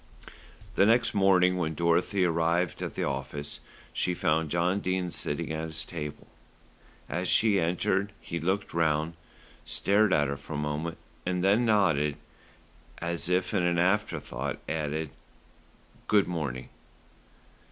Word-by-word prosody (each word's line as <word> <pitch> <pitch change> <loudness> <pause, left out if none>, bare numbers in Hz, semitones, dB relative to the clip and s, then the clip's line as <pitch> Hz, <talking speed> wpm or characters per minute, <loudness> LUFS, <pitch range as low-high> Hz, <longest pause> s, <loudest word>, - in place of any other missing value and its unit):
The 100 - +4
next 120 +1 +3
morning 95 -2 +4
when 80 -3 -1
Dorothy 85 +4 +2
arrived 85 +1 +1
at - - -4
the - - -1
office, 70 +2 -4 0.3
she 90 - 0
found 80 -1 +1
John 85 +4 +1
Dene 95 -2 -1
sitting 80 +1 -3
at 80 +1 -2
his 80 0 -2
table. 75 -3 -6 0.8
As 90 +2 -2
she 105 -1 +4
entered, 95 +3 0
he 85 - -5
looked 95 +5 -1
round, 80 -1 +1 0.5
stared 105 +1 +2
at 75 -4 +3
her 70 0 -3
for 70 +3 -9
a - - -2
moment 75 +3 -3 0.3
and 90 0 -1
then 105 +5 +4
nodded, 80 -9 +3 0.8
and 85 0 -3
as 85 0 -2
if 90 0 +1
as - - +2
an 85 0 +1
after 95 +5 +2
thought 65 +3 -4
added, 80 -1 -2 1.0
"Good 105 -2 +4
morning." 75 -8 -4
85 Hz, 140 wpm, -28 LUFS, 75-95 Hz, 1.0 s, The